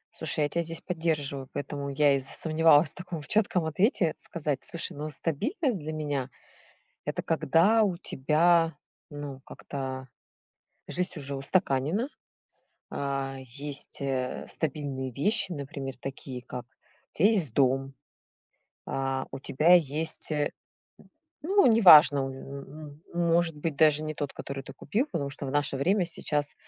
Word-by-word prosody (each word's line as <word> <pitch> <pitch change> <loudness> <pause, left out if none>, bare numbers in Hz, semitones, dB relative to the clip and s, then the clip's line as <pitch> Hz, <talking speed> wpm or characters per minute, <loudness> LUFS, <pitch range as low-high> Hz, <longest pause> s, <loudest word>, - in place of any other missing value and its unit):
Слушай, 155 -1 0
я 145 - +2
тебя 170 - -1
здесь 165 0 -2
поддерживаю, 150 -6 -2
поэтому 140 0 -4
я 140 0 +3
и 135 - +2
засомневалась 155 +3 +3
в - - -13
таком 175 -4 -7
чётком 190 -1 +1
ответе 170 - +1
сказать: 150 -5 -3
"Слушай, 170 -7 -4
ну 150 +1 -4
стабильность, 225 - -1
для 155 +1 -5
меня 145 -4 -2 0.8
это - - -2
когда 210 +7 +3
у 190 -4 0
тебя 165 +2 +2 0.4
ну 145 -2 -7
как-то 130 -2 -6 0.8
жизнь 180 +1 +1
уже 140 -1 -5
устаканена". 145 - 0 0.8
А, 135 -1 -3
есть, 140 +4 -6
э, 130 -2 -2
стабильные 135 -4 -3
вещи, 185 - +2
например, 140 -2 -6
такие 135 -1 -7
как: 125 0 -7 0.5
у - - -17
тебя 195 +7 +6
есть 185 - +1
дом, 135 +1 +2 0.9
а, 135 0 -2
у 135 - -6
тебя 155 +6 +3
есть, 160 0 +1
э, 150 -1 0 0.9
ну, 390 +3 +4
неважно, 175 - +8
м 140 +3 -8
может 170 -2 +1
быть 150 -1 -3
даже 155 0 +4
не 155 0 -4
тот, 145 -1 -4
который 135 0 -6
ты 135 - -9
купил, 220 - -1
потому 145 -5 -2
что 140 0 -7
в 135 - -3
наше 145 -1 0
время, 180 +7 +2
сейчас 150 -3 -1
150 Hz, 140 wpm, -28 LUFS, 135-170 Hz, 0.9 s, неважно